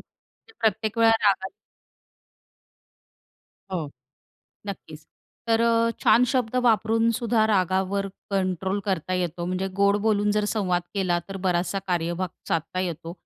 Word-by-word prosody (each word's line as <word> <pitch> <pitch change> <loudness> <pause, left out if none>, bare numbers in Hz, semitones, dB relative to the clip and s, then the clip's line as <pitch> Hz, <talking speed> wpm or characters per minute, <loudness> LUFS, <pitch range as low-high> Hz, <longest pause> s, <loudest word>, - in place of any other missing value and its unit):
ते - - -26
प्रत्येक 220 0 0
वेळा 225 0 +6
रागात 190 -1 +2 2.2
हो, 155 -5 -3 0.8
नक्कीच. 160 -6 -8 0.4
तर 225 0 +2
अ, 230 0 +3
छान 245 - +5
शब्द 250 -3 0
वापरूनसुद्धा 225 +1 +2
रागावर 190 0 +1 0.2
कंट्रोल 190 0 -1
करता 185 -2 -2
येतो, 175 -1 -2
म्हणजे 185 +1 -2
गोड 200 0 +4
बोलून 210 -1 +2
जर 210 - +2
संवाद 185 -5 0
केला, 185 -3 +1
तर 195 - -5
बराचसा 180 +2 0
कार्यभाग 175 0 -1 0.2
साधता 165 +3 -1
येतो. 170 -2 -4
195 Hz, 120 wpm, -25 LUFS, 180-220 Hz, 2.2 s, वेळा